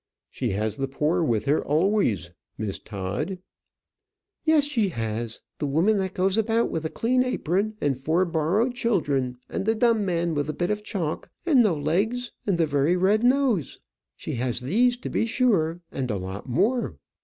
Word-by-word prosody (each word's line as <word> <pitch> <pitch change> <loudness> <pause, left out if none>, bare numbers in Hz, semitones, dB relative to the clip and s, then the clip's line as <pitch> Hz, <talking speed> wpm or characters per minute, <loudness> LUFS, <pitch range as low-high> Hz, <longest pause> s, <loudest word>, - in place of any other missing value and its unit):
"She - - -2
has 105 +3 -1
the 135 -1 -1
poor 150 +6 0
with 120 -8 +1
her 145 +2 +2
always, 150 - +1 0.3
Miss 105 -3 -3
Todd." 105 - -4 1.1
"Yes, 315 -2 +4
she 235 -9 +1
has; 115 -4 -4 0.2
the 145 - -1
woman 175 +9 +2
that 190 -1 -3
goes 190 +3 +2
about 225 +1 +1
with 160 - -2
a - - 0
clean 255 +7 +1
apron 215 -3 -1
and 145 -2 +1
four 160 +8 +1
borrowed 175 +9 +1
children; 145 - 0
and - - -3
the 220 +2 +1
dumb 225 -1 +3
man 170 -3 0
with 145 0 -1
a - - -1
bit 175 +6 -1
of 210 0 -2
chalk 180 -8 -3 0.2
and 290 -7 +5
no 210 -7 +3
legs, 200 +12 0 0.2
and 195 -4 +2
the 165 - +3
very 145 +3 +2
red 200 +5 +3
nose. 250 - +2 0.4
She - - -6
has 125 -1 -1
these, 240 - +2
to 250 - -6
be 225 - +1
sure, 195 -9 +1
and 130 -2 -3
a 105 - -1
lot 95 +6 -6
more. 235 - +1
175 Hz, 180 wpm, -25 LUFS, 140-220 Hz, 1.1 s, and